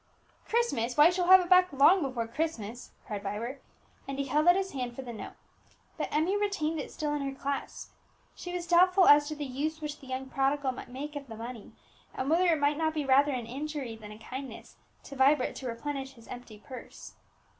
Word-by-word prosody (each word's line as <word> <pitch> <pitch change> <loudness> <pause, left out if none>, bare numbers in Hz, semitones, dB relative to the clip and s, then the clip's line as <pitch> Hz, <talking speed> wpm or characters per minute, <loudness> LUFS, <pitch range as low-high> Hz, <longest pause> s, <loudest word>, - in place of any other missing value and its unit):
"Christmas! 270 - 0
why, 295 - +8
you 340 - +7
shall 360 -1 -1
have 375 0 +9
it 355 - -4
back 365 0 +6
long 290 +7 +5
before 255 -5 -2
Christmas," 240 -4 -4 0.2
cried 210 -3 -5
Vibert; 220 +7 -5 0.5
and 275 0 -4
he 275 - -1
held 300 +5 +1
out 350 - +8
his 385 0 -1
hand 250 -3 -4
for 265 - -6
the 240 -2 -7
note. 220 - -8 0.6
But - - -4
Emmie 325 +6 +1
retained 385 -7 -1
it - - -5
still 300 -1 -2
in 295 - -2
her 275 -1 -5
clasp. 280 0 -4 0.4
She 355 - -8
was 355 -1 -4
doubtful 365 +2 +5
as 290 0 +7
to 305 - -4
the 295 -1 -4
use 295 +5 -3
which 300 -1 -6
the 270 - -14
young 260 +1 -4
prodigal 270 0 0
might 250 - -9
make 290 +4 -7
of 280 -1 -6
the 225 - -8
money, 230 -1 -8 0.4
and 265 +3 -2
whether 355 +3 +4
it 325 -3 +3
might 290 +1 +1
not 315 -1 0
be 300 -2 -1
rather 275 +2 +4
an 245 -3 -3
injury 275 -1 -5
than 215 -1 -11
a 210 - -10
kindness 260 +4 -8 0.3
to 280 - -10
Vibert 270 0 +3
to 260 - -6
replenish 270 +3 -4
his 230 -3 -17
empty 245 -3 -9
purse. 250 +4 -11
280 Hz, 220 wpm, -29 LUFS, 255-315 Hz, 0.6 s, have